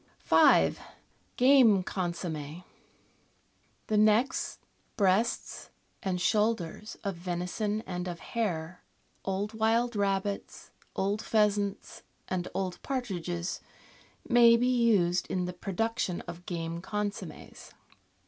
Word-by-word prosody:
' - - -31
5— - - +5 0.6
GAME 245 -7 +6
CONSOMME 170 -3 -4 1.2
The 215 - 0
necks, 215 +4 +2 0.4
breasts, 205 +3 0 0.3
and 185 -2 -1
shoulders 210 0 0
of 200 -2 -2
venison 180 +5 -2
and 180 -3 -5
of 175 -1 -5
hare, 180 -7 -3 0.4
old 195 +3 -2
wild 225 +2 +1
rabbits, 200 0 -2 0.2
old 200 +3 0
pheasants, 205 -2 0 0.3
and 180 -1 -2
old 185 -2 -3
partridges 185 -9 -3 0.7
may 235 -1 +7
be 240 - +1
used 225 -8 +2
in 180 -1 -1
the 180 - -4
production 195 +1 -2
of 175 +1 -10
game 165 -1 -4
consommes. 210 +2 -5
200 Hz, 100 wpm, -29 LUFS, 180-220 Hz, 1.2 s, may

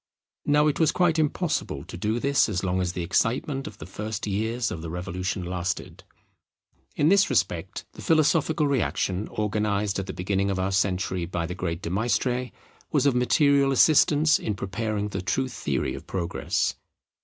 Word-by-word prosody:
Now 150 +1 +4
it 150 - +1
was 160 -2 +4
quite 170 -3 +2
impossible 150 - -1
to 90 - -9
do 105 +6 -1
this 140 -1 +2
as 95 -3 -2
long 95 0 0
as 90 -1 -1
the 90 - -3
excitement 130 - 0
of 105 - -9
the - - -9
first 105 +3 -5
years 110 +4 -1
of 80 - -5
the 80 - -6
revolution 90 +2 -3
lasted. 90 0 -4 0.9
In 145 - +3
this 200 +1 +4
respect 95 - -1
the - - -12
philosophical 155 0 +2
reaction, 110 -7 0
organized 105 -1 -1
at 95 - -4
the - - -5
beginning 100 +2 -1
of 95 - -1
our 95 +1 -1
century 95 -2 0
by 85 -1 -2
the 90 - -4
great 90 -1 -4
De 85 - -3
Maistre, 120 +5 0 0.4
was - - +2
of 140 - +4
material 140 +2 +3
assistance 155 +2 +5
in 105 - -2
preparing 105 +1 -3
the 95 -2 -4
true 130 +8 0
theory 70 - -2
of - - -9
Progress. 85 -3 -1
105 Hz, 175 wpm, -26 LUFS, 90-135 Hz, 0.9 s, assistance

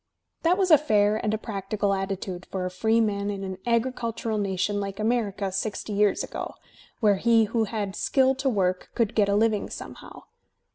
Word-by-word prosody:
That 345 +2 +3
was 375 -3 +2
a 310 - +9
fair 210 -6 +2
and 215 - +1
a 215 - 0
practical 200 -1 -2
attitude 190 -2 -4
for 185 -1 -3
a 180 - -3
freeman 210 0 +1
in 200 -1 -4
an 190 -1 -5
agricultural 230 -2 -1
nation 200 +1 -1
like 195 0 -5
America 210 -4 0
sixty 205 +2 -3
years 205 0 +2
ago, - - -6 0.5
where 205 -3 +4
he 230 +2 +4
who 225 +1 0
had 205 -2 -4
skill 265 -1 +3
to 270 +1 -1
work 185 -5 0
could 230 -3 +1
get 205 -2 +2
a 200 - +2
living 215 -1 +1
somehow. - - -9
210 Hz, 180 wpm, -26 LUFS, 195-225 Hz, 0.5 s, a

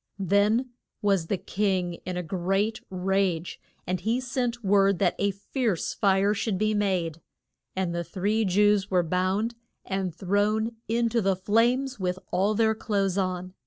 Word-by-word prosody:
Then 205 +6 +2 0.3
was 195 -5 +2
the 200 - 0
king 185 -3 -1
in 180 -1 -3
a 180 - -2
great 195 +5 -1
rage, 185 -2 -1 0.2
and 180 0 -1
he 225 +7 0
sent 245 -2 -2
word 195 -1 +4
that - - +2
a 200 - +2
fierce 200 - -2
fire 200 0 +2
should 215 -2 -1
be 215 +2 +1
made. 180 -6 -1 0.5
And 185 -2 -1
the 170 0 -2
three 205 +5 0
Jews 205 +1 +3
were 180 -2 +3
bound 185 +7 0 0.3
and 190 -2 -2
thrown 210 +6 0
in 235 +1 +1
to 230 0 +1
the 195 -1 +2
flames 235 +7 +1
with 180 -1 -1
all 195 +4 +1
their 220 0 +3
clothes 200 -4 -1
on. 185 -1 -2
195 Hz, 160 wpm, -26 LUFS, 185-215 Hz, 0.5 s, word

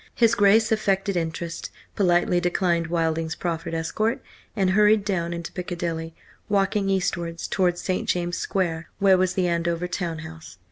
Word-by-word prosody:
His 230 -1 +4
Grace 205 +3 +4
affected 200 -2 +1
interest, 170 0 -3 0.3
politely 175 -2 +3
declined 175 -1 +1
Wilding's 165 -1 -1
proffered 165 -1 -3
escort, 215 +8 -1 0.4
and 190 -3 +2
hurried 210 +1 +4
down 170 -4 -1
into 170 -1 -5
Piccadilly, 170 -2 -4 0.3
walking 195 0 +1
eastwards 170 -3 -1
towards 175 -2 +1
St. 185 -1 -2
James's 175 -1 -1
Square, 170 -4 -2
where 195 -1 +5
was 185 0 +1
the 185 -2 +1
Andover 170 0 -1
town 170 -2 -3
house. 160 - -11
175 Hz, 145 wpm, -24 LUFS, 170-195 Hz, 0.4 s, where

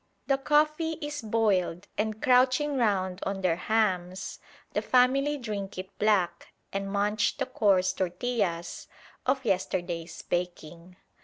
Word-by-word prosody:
The 275 -1 +1
coffee 305 +3 +2
is 295 -2 -5
boiled, 205 -5 +1
and, 215 0 -2
crouching 255 +3 +4
round 195 -6 +1
on 195 0 -3
their 180 -3 +2
hams, 190 -3 -1 0.3
the - - +1
family 275 +4 +3
drink 205 -6 -5
it 185 +1 -7
black 190 -5 +1 0.2
and 195 0 -3
munch 205 +1 +1
the - - -1
coarse 190 -4 +2
tortillas 180 -2 -2 0.4
of 265 0 +1
yesterday's 175 -4 -2
baking. 175 0 -4
205 Hz, 125 wpm, -28 LUFS, 180-250 Hz, 0.4 s, crouching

